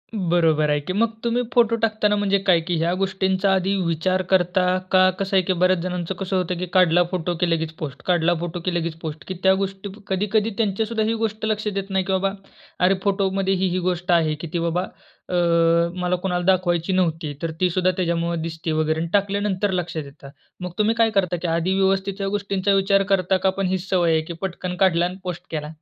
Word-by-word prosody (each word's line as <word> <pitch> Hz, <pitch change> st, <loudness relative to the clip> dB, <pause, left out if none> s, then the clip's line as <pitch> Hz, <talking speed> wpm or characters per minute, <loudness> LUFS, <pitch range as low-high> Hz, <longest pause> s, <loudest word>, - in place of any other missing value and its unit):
बरोबर 165 Hz, -5 st, +2 dB
आहे 145 Hz, 0 st, +2 dB
की. 185 Hz, +6 st, -4 dB
मग, 225 Hz, +2 st, +1 dB
तुम्ही 235 Hz, +1 st, +1 dB
फोटो 230 Hz, -1 st, +4 dB
टाकताना 215 Hz, -2 st, +1 dB
म्हणजे 200 Hz, -1 st, +2 dB
काय 175 Hz, -3 st, +5 dB
की 175 Hz, -, 0 dB
ह्या 170 Hz, +2 st, +1 dB
गोष्टींचा 190 Hz, 0 st, +1 dB
आधी 190 Hz, +1 st, +1 dB
विचार 185 Hz, +3 st, 0 dB
करता? 180 Hz, 0 st, +2 dB
का 185 Hz, 0 st, +6 dB
कसं 195 Hz, 0 st, -1 dB
आहे, -, -, +5 dB
की 185 Hz, -, +1 dB
बऱ्याच 185 Hz, 0 st, +2 dB
जणांचं 180 Hz, 0 st, -3 dB
कसं 195 Hz, 0 st, -2 dB
होतं 180 Hz, -1 st, -1 dB
की 180 Hz, -, -3 dB
काढला 175 Hz, -1 st, +5 dB
फोटो 175 Hz, -1 st, -2 dB
की 180 Hz, -2 st, +1 dB
लगेच 160 Hz, -1 st, -1 dB
पोस्ट, 140 Hz, -3 st, -6 dB
काढला 175 Hz, -1 st, +3 dB
फोटो 175 Hz, +1 st, -4 dB
की 180 Hz, -, 0 dB
लगेच 170 Hz, -1 st, -1 dB
पोस्ट, 155 Hz, -1 st, -6 dB
की 185 Hz, -, -3 dB
त्या 190 Hz, 0 st, +6 dB
गोष्टी 195 Hz, +1 st, -3 dB, 0.2 s
कधी-कधी 210 Hz, +3 st, 0 dB
त्यांच्या 220 Hz, 0 st, 0 dB
सुद्धा 220 Hz, -1 st, -1 dB
ही 225 Hz, -, +1 dB
गोष्ट 220 Hz, -1 st, -2 dB
लक्षात 210 Hz, -2 st, -2 dB
येत 195 Hz, 0 st, -3 dB
नाही 190 Hz, -1 st, 0 dB
की 195 Hz, -, -2 dB
बाबा 195 Hz, +1 st, +1 dB, 0.5 s
अरे, 185 Hz, +2 st, +4 dB
फोटो 195 Hz, -1 st, +1 dB
मध्ये 195 Hz, 0 st, 0 dB
ही-ही 185 Hz, -1 st, 0 dB
गोष्ट 180 Hz, 0 st, -1 dB
आहे 160 Hz, -3 st, +3 dB
की 170 Hz, -, -5 dB
ती 170 Hz, -, 0 dB
बाबा 170 Hz, +2 st, 0 dB, 0.5 s
अ, 180 Hz, -, -2 dB, 0.7 s
मला 180 Hz, 0 st, +1 dB
कुणाला 180 Hz, -1 st, -2 dB
दाखवायची 185 Hz, -1 st, +1 dB
नव्हती. 160 Hz, -5 st, 0 dB
तर 165 Hz, -1 st, -2 dB
ती 180 Hz, -, +3 dB
सुद्धा 185 Hz, +1 st, +1 dB
त्याच्यामुळं 170 Hz, -2 st, -1 dB
दिसते 165 Hz, 0 st, -4 dB
वगैरे 155 Hz, 0 st, 0 dB
आणि 165 Hz, 0 st, -3 dB
टाकल्यानंतर 200 Hz, 0 st, 0 dB
लक्षात 170 Hz, -4 st, -3 dB
येतं. 140 Hz, 0 st, -13 dB, 0.3 s
मग 180 Hz, -1 st, -4 dB
तुम्ही 215 Hz, +2 st, +2 dB
काय 230 Hz, -1 st, +3 dB
करता? 180 Hz, -2 st, +2 dB
की 175 Hz, -, -2 dB
आधी 170 Hz, +3 st, 0 dB
व्यवस्थित 195 Hz, 0 st, +1 dB
ह्या 195 Hz, -, -1 dB
गोष्टींचा 200 Hz, 0 st, 0 dB
विचार 195 Hz, 0 st, +3 dB
करता 190 Hz, 0 st, +2 dB
का? 190 Hz, +1 st, +1 dB
पण 190 Hz, 0 st, -1 dB
ही 185 Hz, +1 st, 0 dB
सवय 175 Hz, -2 st, +1 dB
आहे 160 Hz, 0 st, +2 dB
की 170 Hz, +2 st, -7 dB
पटकन 180 Hz, -1 st, -4 dB
काढला 175 Hz, -1 st, +2 dB
आणि 180 Hz, +1 st, -4 dB
पोस्ट, 180 Hz, -1 st, -5 dB
केला? 150 Hz, -1 st, -4 dB
185 Hz, 215 wpm, -22 LUFS, 170-195 Hz, 0.7 s, का